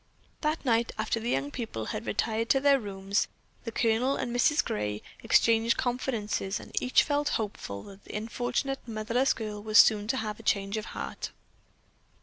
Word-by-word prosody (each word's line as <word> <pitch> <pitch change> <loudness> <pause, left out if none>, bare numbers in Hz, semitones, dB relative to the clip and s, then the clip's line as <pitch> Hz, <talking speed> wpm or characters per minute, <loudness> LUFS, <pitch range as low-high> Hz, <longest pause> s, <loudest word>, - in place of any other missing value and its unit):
That 305 0 -1
night 230 -1 +2
after 220 +1 0
the 230 +2 -3
young 140 - 0
people 180 - -4
had 110 +2 -5
retired 220 - 0
to 270 - +5
their 280 0 +5
rooms, 200 -2 -1 0.4
the 230 - -3
Colonel 230 +4 +2
and 240 - -3
Mrs. 295 +5 +3
Gray 105 0 -2 0.2
exchanged 230 0 +4
confidences 225 -6 -1
and - - -12
each 255 - +4
felt 290 0 0
hopeful 195 - -5
that 200 0 -13
the - - -5
unfortunate 245 +5 -2
motherless 230 +4 +1
girl 210 -3 -5
was 215 +1 +2
soon 210 0 +6
to 265 - 0
have 215 -3 -3
a - - -9
change 200 0 0
of 215 0 -3
heart. - - -5
225 Hz, 170 wpm, -29 LUFS, 205-245 Hz, 0.4 s, soon